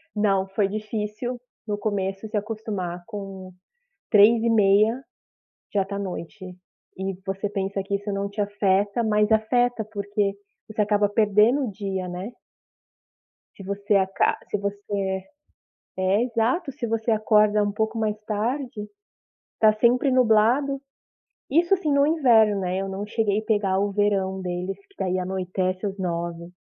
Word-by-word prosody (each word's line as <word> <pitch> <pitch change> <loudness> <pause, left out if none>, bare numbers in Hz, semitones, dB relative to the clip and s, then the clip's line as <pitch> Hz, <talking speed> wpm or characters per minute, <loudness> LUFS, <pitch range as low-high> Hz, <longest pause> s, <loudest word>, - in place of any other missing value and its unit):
Não, 195 -2 +2
foi 195 +1 +1
difícil 215 +3 -4 0.3
no 205 -1 -1
começo 200 -1 -2
se 215 0 -2
acostumar 205 -5 -4
com 195 -3 -8 0.6
15h30 220 +1 +5 0.7
já 195 -2 +2
tá 200 0 -5
noite, 190 +1 -6 0.5
e 190 +1 -3
você 195 +1 -2
pensa 195 -1 -3
que 200 +1 -2
isso 205 +1 -4
não 200 0 -2
te 200 +1 -4
afeta, 205 +2 +1
mas 210 0 +2
afeta, 225 +1 +2
porque 205 0 -1 0.3
você 215 -1 -2
acaba 205 0 +2
perdendo 215 +6 +3
o - - -4
dia, 190 -2 -4
né. 180 +5 -6 1.2
Se 195 - -11
você 200 +2 -1
aca 190 0 +2
se - - 0
você 200 -1 -3 0.8
é, 190 +4 +2
exato, 250 +7 0
se 260 -2 -5
você 225 +1 -1
acorda 215 -1 +3
um 205 - 0
pouco 220 +2 -2
mais 215 -1 -1
tarde, 225 +1 -3 0.7
está 215 -1 +5
sempre 250 +4 +3
nublado. 255 +3 +3 0.7
Isso 340 +6 +4
sim, 315 -6 -1
no 280 0 +4
inverno, 230 -10 +4
né, 185 0 -1
eu 195 0 -3
não 195 +2 -4
cheguei 210 -1 0
pegar 205 -3 +1
o 200 +1 +1
verão 195 -2 0
deles, 180 +2 -4
que - - -27
daí 185 -1 0
anoitece 185 +1 -2
às 195 -1 -4
21h. 170 -2 -3
205 Hz, 140 wpm, -24 LUFS, 195-220 Hz, 1.2 s, 15h30